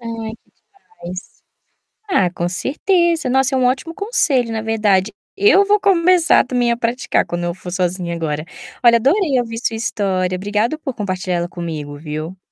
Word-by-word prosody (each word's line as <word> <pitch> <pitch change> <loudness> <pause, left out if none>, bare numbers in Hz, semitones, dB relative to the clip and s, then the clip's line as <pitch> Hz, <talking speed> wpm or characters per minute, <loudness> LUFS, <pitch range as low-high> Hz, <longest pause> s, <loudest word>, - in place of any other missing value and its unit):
Ai, 230 -1 -5
que - - -35 0.3
demais. 185 - -10 0.7
Ah, 185 - +3
com 175 -1 -2
certeza. 335 - +1
Nossa, 265 +1 +2
é - - +2
um 255 - +2
ótimo 265 +6 0
conselho, 320 - +1
na 220 -1 -2
verdade. 215 -3 +1 0.2
Eu 400 0 +5
vou 415 +1 +3
começar 360 -5 +4
também 245 -2 +1
a 235 - 0
praticar 240 +2 0
quando 175 0 -3
eu 175 0 -2
for 180 -1 -9
sozinha 180 -1 -2
agora. 155 -1 -3 0.4
Olha, 235 -1 +7
adorei 275 - +2
ouvir 230 -1 -4
sua 230 -1 -2
história. 190 -5 -1
Obrigado 210 +9 -1
por 270 -4 -5
compartilhar 185 -4 -2
ela 175 0 -3
comigo, 155 -4 -6
viu. 155 +4 -6
225 Hz, 170 wpm, -18 LUFS, 180-270 Hz, 0.7 s, Olha